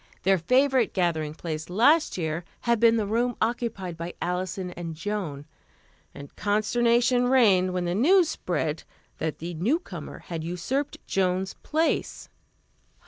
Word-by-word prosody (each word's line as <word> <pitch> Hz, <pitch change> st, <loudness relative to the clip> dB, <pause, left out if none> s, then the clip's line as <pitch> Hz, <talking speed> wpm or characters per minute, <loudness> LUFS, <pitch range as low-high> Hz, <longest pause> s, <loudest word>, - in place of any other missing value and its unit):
Their 190 Hz, 0 st, +3 dB
favorite 255 Hz, -, +2 dB
gathering 160 Hz, -5 st, 0 dB
place 160 Hz, -1 st, -5 dB
last 265 Hz, -, +3 dB
year 160 Hz, 0 st, -2 dB, 0.2 s
had 235 Hz, -2 st, +1 dB
been 230 Hz, 0 st, +5 dB
the 215 Hz, -, 0 dB
room 235 Hz, +3 st, 0 dB
occupied 220 Hz, -7 st, -2 dB
by 170 Hz, +1 st, -6 dB
Alison 180 Hz, +1 st, -3 dB
and 170 Hz, -2 st, -6 dB
Joan, 165 Hz, -6 st, -4 dB, 0.7 s
and 140 Hz, 0 st, -12 dB
consternation 240 Hz, +4 st, +2 dB
reigned 200 Hz, -8 st, +4 dB
when 180 Hz, -1 st, -2 dB
the 175 Hz, -, -1 dB
news 335 Hz, -, +4 dB
spread 165 Hz, -, -2 dB, 0.4 s
that 155 Hz, -2 st, -2 dB
the 170 Hz, +3 st, -6 dB
newcomer 185 Hz, -, -2 dB
had 165 Hz, -2 st, -6 dB
usurped 180 Hz, -, -2 dB
Joan's 185 Hz, 0 st, 0 dB
place. 320 Hz, +2 st, -1 dB
190 Hz, 135 wpm, -26 LUFS, 170-240 Hz, 0.7 s, been